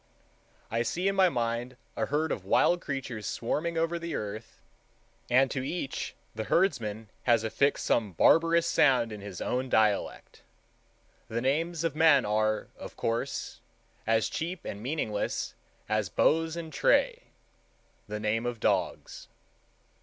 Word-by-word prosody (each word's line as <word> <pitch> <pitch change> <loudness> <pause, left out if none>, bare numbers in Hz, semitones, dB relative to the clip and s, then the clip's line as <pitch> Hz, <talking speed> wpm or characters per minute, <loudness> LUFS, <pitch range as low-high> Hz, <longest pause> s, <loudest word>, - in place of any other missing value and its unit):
I 115 +1 +1
see 175 +11 -1
in 195 - +1
my 190 -1 +5
mind 120 -1 -2 0.2
a 110 - -1
herd 155 +3 0
of - - -3
wild 175 0 +3
creatures 130 -6 -4
swarming 165 +8 -2
over 165 +1 0
the 170 -1 -4
earth, 105 +2 -6 0.7
and 130 +2 +4
to 130 - -2
each 140 -1 -4 0.2
the 110 - -4
herdsman 110 - 0
has 115 -2 +4
affixed 140 +5 +1
some 105 -5 +1
barbarous 165 - +4
sound 125 -5 +3
in 105 -1 -7
his 100 -2 -8
own 130 +1 -1
dialect. 110 -3 0 0.9
The 115 - -2
names 160 +6 0
of 165 -3 -1
men 155 -4 +5
are, 110 +1 0
of - - -9
course, 115 0 -3 0.5
as 115 0 +3
cheap 170 +3 -4
and 100 - -6
meaningless 120 -5 -2 0.3
as 110 -3 0
Bose 165 +1 +2
and 160 -2 -6
Tray, - - +2 0.8
the 105 0 -4
names 110 +2 0
of 120 -2 -4
dogs. - - -1
125 Hz, 140 wpm, -29 LUFS, 110-165 Hz, 0.9 s, my